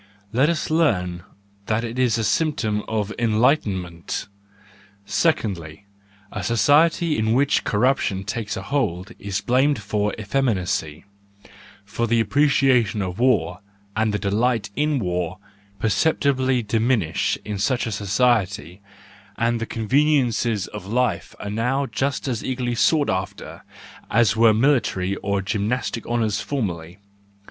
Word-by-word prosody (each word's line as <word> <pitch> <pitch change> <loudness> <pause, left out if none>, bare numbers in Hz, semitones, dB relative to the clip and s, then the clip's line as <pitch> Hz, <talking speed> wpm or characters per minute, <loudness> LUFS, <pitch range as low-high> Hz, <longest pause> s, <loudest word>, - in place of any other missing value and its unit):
Let 135 +6 +3
us 165 -2 -2
learn 90 - +1 0.5
that 110 +1 0
it 120 +2 -4
is 125 -3 +2
a 115 - -1
symptom 110 -7 0
of 110 -1 -2
enlightenment. 105 - 0 0.8
—Secondly, 100 - -1 0.5
a - - -5
society 150 +5 +3
in 110 +1 +1
which 135 +3 +2
corruption 105 -4 +1
takes 105 0 -4
a - - -5
hold 110 -8 -2
is 100 -1 -3
blamed 135 +2 +2
for 105 0 -1
effeminacy: 100 - -1 0.8
for 115 +4 -2
the 115 +1 +2
appreciation 130 -5 +2
of 90 +1 -5
war, 115 -10 +2 0.4
and 110 0 +1
the 105 - 0
delight 105 +1 0
in 150 0 +1
war 90 -4 -2 0.4
perceptibly 130 +3 +1
diminish 110 -5 0
in 105 -1 -4
such 125 +5 0
a 115 - -3
society, 100 -3 0 0.6
and 115 0 +1
the 115 - -3
conveniences 120 -4 +1
of 105 -3 -9
life 125 +4 -1
are 100 - -5
now 125 +6 0
just 135 +5 -2
as 120 -4 -2
eagerly 125 -2 -2
sought 145 +5 +2
after 95 0 -5 0.5
as 115 -2 +3
were 115 0 +6
military 110 -6 +1
and 100 -1 -1
gymnastic 110 +3 -2
honours 110 -4 0
formerly. 90 - -4
115 Hz, 125 wpm, -22 LUFS, 100-130 Hz, 0.8 s, were